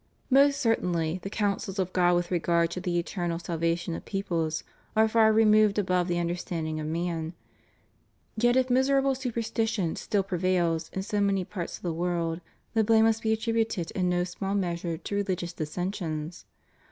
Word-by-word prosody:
Most 280 +1 +5
certainly, 180 -7 0
the 195 - -5
counsels 205 -1 -1
of 185 -1 -1
God 175 -1 +4
with 175 0 -1
regard 170 -1 +2
to 180 - -4
the 175 -1 -1
eternal 175 -1 -2
salvation 170 0 -1
of - - -6
peoples 170 -6 -2 0.3
are 220 0 +5
far 220 0 +4
removed 215 -1 +5
above 180 -3 +1
the 175 -1 0
under 170 0 -1
standing 160 -3 -4
of 155 - -4
man; 165 0 -2 1.0
yet 240 +2 +3
if 260 -1 +2
miserable 270 +1 +3
superstition 225 -7 -1
still 205 -2 0
pre 185 -2 -3
vails 170 -3 +1
in 190 - -3
so 205 0 -1
many 195 -2 +1
parts 180 -4 -5
of - - -22
the 175 -2 -1
world, 170 0 -1 0.3
the 225 - +3
blame 220 +1 +5
must 225 0 +2
be 220 - 0
attributed 220 -5 0
in 180 -2 0
no 175 0 +1
small 195 +2 -3
measure 170 -3 -2
to 200 - -5
religious 185 -3 -2
dissensions. 165 -1 -4
185 Hz, 175 wpm, -28 LUFS, 170-215 Hz, 1.0 s, Most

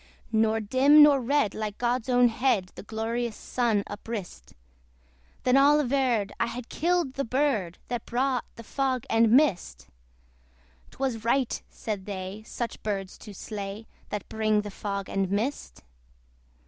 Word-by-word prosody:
Nor 220 0 +2
dim 270 +7 +6
nor 285 -2 +6
red, 250 -4 +1
like 215 -1 -4
God's 245 0 -1
own 245 -1 +5
head, 225 -6 0
The - - -9
glorious 225 +2 -3
Sun 230 -5 0
uprist: 205 - -7 0.9
Then 250 - +3
all 290 +2 +6
averred, 250 -7 +1
I - - +1
had 240 0 -7
killed 345 -4 0
the 275 - -2
bird 235 - 0
That 240 -2 -4
brought 255 0 0
the 230 - -10
fog 260 0 -1
and 225 0 +4
mist. 190 - +2 1.0
'Twas 255 -5 -3
right, 245 +2 +1
said 205 -3 -5
they, 195 +1 -5
such 235 -1 -5
birds 195 -3 -3
to 210 - -10
slay, 205 +2 -6 0.2
That 210 -1 -5
bring 215 -1 +1
the 205 0 -7
fog 200 -1 -4
and 195 -1 -1
mist. 220 +9 -3
230 Hz, 145 wpm, -27 LUFS, 205-260 Hz, 1.0 s, dim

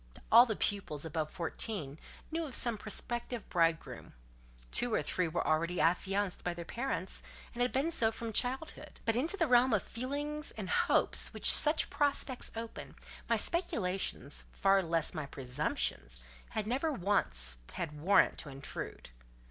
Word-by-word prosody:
All 235 +3 +8
the 220 - -1
pupils 175 -9 -1
above 155 -1 -3
fourteen 165 -3 -4 0.3
knew 330 +1 -2
of 270 - -5
some 235 -2 +3
prospective 235 +2 -3
bridegroom; 165 -2 -1 0.6
two 245 - +3
or - - 0
three 180 +4 -1
were 165 +2 -2
already 170 +3 0
affianced 190 +4 0
by 175 -1 -2
their 170 -1 -7
parents, 230 -5 -2 0.3
and 240 - -4
had 245 - +2
been 280 +6 0
so 230 -9 +2
from 225 0 -6
childhood: 260 +8 -2
but 225 - +1
into 320 +11 -1
the 330 - +2
realm 250 -2 +4
of 210 - +2
feelings 290 +5 -4
and - - -6
hopes - - +2
which - - +7
such 305 +1 +6
prospects 280 -3 0
open, 225 0 -7 0.3
my - - +3
speculations, 190 - -2
far 195 - +3
less 165 -2 -1
my 155 -4 -5
presumptions, 95 - -3 0.3
had 215 - -3
never 270 +8 0
once 65 - +1 0.2
had 150 -3 -5
warrant 195 +5 +4
to 150 - -6
intrude. 135 - -7
205 Hz, 155 wpm, -32 LUFS, 160-250 Hz, 0.6 s, All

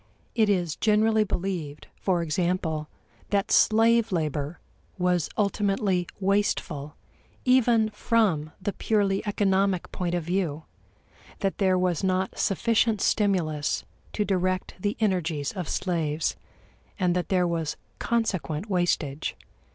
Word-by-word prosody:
It 220 -3 +3
is 175 -6 +1
generally 220 +1 +3
believed, 175 -7 -4
for 180 -3 0
example, 160 -1 -1 0.4
that 200 -1 0
slave 225 0 +4
labor 155 -2 -2 0.4
was 180 -3 +1
ultimately 195 -3 +1
wasteful 185 -7 0 0.5
even 240 -4 +4
from 195 -11 +1
the 200 +2 -2
purely 200 -3 +1
economic 195 -2 +1
point 175 -1 -2
of 175 - -1
view 170 -3 -1 0.8
that 195 -1 -1
there 190 -2 +3
was 180 -3 0
not 185 0 0
sufficient 225 +2 +2
stimulus 175 -9 +1 0.3
to 210 - 0
direct 185 -1 0
the 205 +3 -1
energies 170 -9 0
of 180 -6 -5
slaves, 165 -4 -1 0.6
and 180 -3 +1
that 180 - -1
there 180 -2 +2
was 165 -3 -2 0.2
consequent 205 -5 -1
wastage. 160 -5 0
185 Hz, 115 wpm, -26 LUFS, 170-205 Hz, 0.8 s, slave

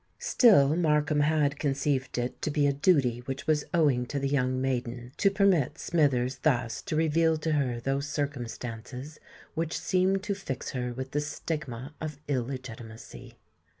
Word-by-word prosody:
Still 155 - +5
Markham 150 -3 +2
had 145 -1 +2
conceived 140 -2 -1
it 120 +1 -3
to - - -1
be 145 -1 +1
a 140 - +3
duty 140 -6 +2
which 135 0 -4
was 150 -2 +1
owing 140 -7 +2
to 145 - -3
the 140 0 0
young 130 -2 +1
maiden, 125 -2 -3
to 200 - +4
permit 185 -8 +2
Smithers 135 -7 +1
thus 120 -6 0
to - - -4
reveal 160 +1 +3
to 160 +1 -2
her 130 -5 0
those 135 +3 -1
circumstances 125 0 -5 0.3
which 165 0 -2
seemed 190 +1 +1
to 205 - -1
fix 195 -10 -5
her 125 -1 -3
with 130 +2 -6
the 145 - 0
stigma 145 -3 -5
of 155 -3 -4
illegitimacy. 125 -4 -6
140 Hz, 155 wpm, -28 LUFS, 125-155 Hz, 0.3 s, Still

